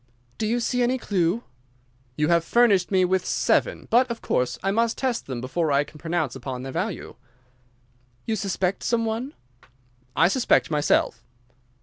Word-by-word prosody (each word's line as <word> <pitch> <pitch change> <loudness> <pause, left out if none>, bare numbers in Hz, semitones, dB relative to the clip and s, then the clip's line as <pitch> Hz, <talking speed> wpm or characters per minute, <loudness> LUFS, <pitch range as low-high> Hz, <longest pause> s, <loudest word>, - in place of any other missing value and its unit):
"Do 215 - 0
you 235 +3 +1
see 245 +1 0
any 245 +2 +2
clue?" 195 -1 0 0.7
"You 150 +3 +1
have 170 -1 +3
furnished 205 -3 +3
me 185 -2 +3
with 185 0 +1
seven, - - +1
but, 250 +2 +4
of 235 -1 -4
course, 125 0 -1
I 195 - +1
must 230 +2 +1
test 255 -3 -2
them 130 -3 -4
before 155 +5 -1
I 140 +1 +3
can 150 +1 -15
pronounce 160 -5 -2
upon 130 -1 -6
their 135 - -6
value." 185 +6 -4 1.1
"You 225 - 0
suspect 195 -2 -1
some 230 -1 0
one?" 230 +6 -3 0.8
"I 165 - +5
suspect 235 -3 +2
myself." 145 -5 +1
190 Hz, 160 wpm, -24 LUFS, 150-230 Hz, 1.1 s, I